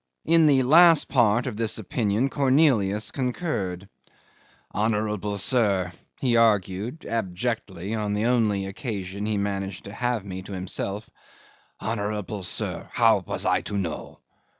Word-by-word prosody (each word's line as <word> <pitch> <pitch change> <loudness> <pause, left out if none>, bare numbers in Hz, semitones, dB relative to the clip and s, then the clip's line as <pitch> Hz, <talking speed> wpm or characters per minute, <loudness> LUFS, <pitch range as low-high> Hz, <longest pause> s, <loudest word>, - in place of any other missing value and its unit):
In 165 -1 +5
the 135 -3 +4
last 165 +4 +6
part 120 -2 +3
of 120 -5 -4
this 110 -4 0
opinion 120 -1 -1
Cornelius 130 -8 +2
concurred. 120 - -3 0.9
"Honourable 105 -1 -1
sir," 100 -5 +2 0.3
he 125 -3 +1
argued 110 - +1
abjectly 105 -2 -3
on 105 -2 -1
the 105 +2 0
only 110 -5 +1
occasion 100 -2 -5
he 110 -1 0
managed 95 -2 -3
to 100 - -9
have 120 -2 -2
me 95 -1 -6
to 100 +2 -9
himself 95 +3 -4 0.7
"honourable 105 -2 -3
sir, 90 - -3
how - - +4
was - - -3
I - - +2
to 105 - -4
know? 85 -5 -4
105 Hz, 130 wpm, -25 LUFS, 100-120 Hz, 0.9 s, last